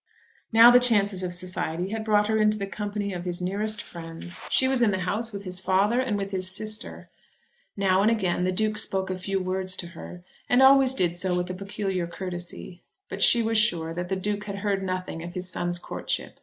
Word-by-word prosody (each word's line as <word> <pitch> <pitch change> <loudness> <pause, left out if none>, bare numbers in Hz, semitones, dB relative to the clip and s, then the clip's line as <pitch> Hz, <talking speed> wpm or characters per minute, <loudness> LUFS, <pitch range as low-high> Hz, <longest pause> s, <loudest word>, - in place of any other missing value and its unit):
Now 230 +2 +9
the 245 - +7
chances 205 -6 +2
of 180 -1 -3
society 180 0 -2
had 220 +1 -3
brought 210 -1 +3
her 220 +1 +1
into 215 0 +3
the 200 - -3
company 205 0 -4
of 175 -1 -5
his 175 -1 -3
nearest 210 +4 -1
friends. 165 0 -9
She 260 - +3
was 260 -2 +1
in 235 - +4
the 190 -2 -1
house 220 +5 -2
with 200 -1 -7
his 185 -1 -2
father 195 +6 +2
and 250 -5 0
with 195 0 -4
his 185 -1 +1
sister. 215 +3 -3 0.7
Now 190 -1 +3
and 210 - +4
again 190 -6 0
the 185 - +1
Duke 215 +3 0
spoke 190 -1 -2
a - - -2
few 195 +1 -2
words 185 0 -2
to 175 - -5
her, 175 +1 -10 0.3
and 245 +2 +5
always 265 -1 +6
did 175 -7 +1
so 180 0 0
with 180 0 -2
a - - -4
peculiar 195 -2 -3
courtesy. 175 0 -6 0.3
But - - -6
she 235 -1 +6
was 225 0 +2
sure 165 -7 0
that 175 +1 -5
the 190 - 0
Duke 205 +2 -3
had 200 -1 -5
heard 200 -1 +1
nothing 185 -3 -4
of 175 +2 -8
his 180 0 -4
son's 175 -1 -2
courtship. - - -5
195 Hz, 220 wpm, -26 LUFS, 180-215 Hz, 0.7 s, Now